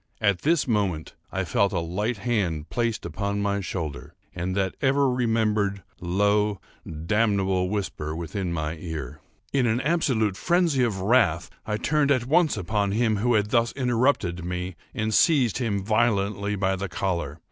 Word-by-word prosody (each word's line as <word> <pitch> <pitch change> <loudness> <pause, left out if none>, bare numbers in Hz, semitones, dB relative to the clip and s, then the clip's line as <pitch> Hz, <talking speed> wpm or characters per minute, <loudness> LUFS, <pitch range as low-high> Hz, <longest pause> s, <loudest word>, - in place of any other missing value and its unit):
At 100 -4 +1
this 160 -1 +2
moment 100 -8 -1 0.2
I - - -1
felt 100 -1 +1
a 90 - 0
light 105 +8 -2
hand 95 -8 -1
placed 115 -2 -1
upon 100 +5 -2
my 100 0 0
shoulder, 80 -5 -5 0.2
and 90 +1 -3
that 95 -2 0
ever 140 +1 +3
remembered, 110 -5 0 0.2
low, 100 +3 +1 0.5
damnable 95 -3 +1
whisper 95 -7 -3
within 85 +2 -3
my 80 -1 -3
ear. 80 -6 -6 0.3
In 130 -3 +3
an 115 +1 +1
absolute 130 - +1
phrenzy 170 -7 +2
of 105 -6 -1
wrath, 95 -6 +2 0.2
I 105 -1 0
turned 150 +4 +1
at 130 -4 +2
once 155 -1 +3
upon 100 +1 0
him 110 -1 +2
who 120 +3 +2
had 105 0 +1
thus 115 -1 +2
interrupted 120 -8 +1
me, 90 0 -4 0.2
and 110 0 -1
seized 130 - +3
him 105 -6 -1
violently 105 -2 +1
by 95 -1 +1
the 100 0 -4
collar. 85 -5 -2
105 Hz, 160 wpm, -25 LUFS, 95-120 Hz, 0.5 s, ever